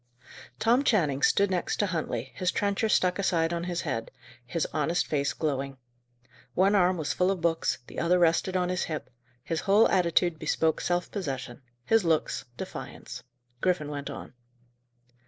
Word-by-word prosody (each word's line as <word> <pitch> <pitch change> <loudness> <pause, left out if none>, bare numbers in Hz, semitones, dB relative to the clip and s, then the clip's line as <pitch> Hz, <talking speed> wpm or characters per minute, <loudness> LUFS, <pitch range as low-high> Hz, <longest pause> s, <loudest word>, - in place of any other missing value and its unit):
Tom 240 - +3
Channing 155 - +2
stood 200 -1 +3
near 180 -1 +2
to 205 - -1
Huntley, 135 - -3
his 185 -1 0
trencher 205 +2 0
stuck 180 -2 +2
aside 170 -4 +1
on 170 0 -2
his 175 -1 -2
head, 115 -7 -3 0.4
his 165 +4 -1
honest 160 +3 +1
face 140 -2 0
glowing. 135 -2 -2 0.8
One 195 +3 +4
arm 185 -2 +3
was 155 -3 -1
full 180 +1 +2
of 195 -2 0
books, 165 -1 +1
the - - -7
other 175 +2 +3
rested 175 +2 +2
on 180 -1 0
his 180 0 -1
hip: 155 -4 -5 0.3
his 160 +2 -2
whole 205 +6 +5
attitude 175 -2 +2
bespoke 160 -1 +1
self 175 0 -1
possession; 135 - -4 0.2
his 225 -2 +3
looks, 165 -2 0
defiance. - - -7 0.4
Griffin 180 -5 0
went 145 -1 -5
on. - - -8
175 Hz, 160 wpm, -28 LUFS, 155-185 Hz, 0.8 s, whole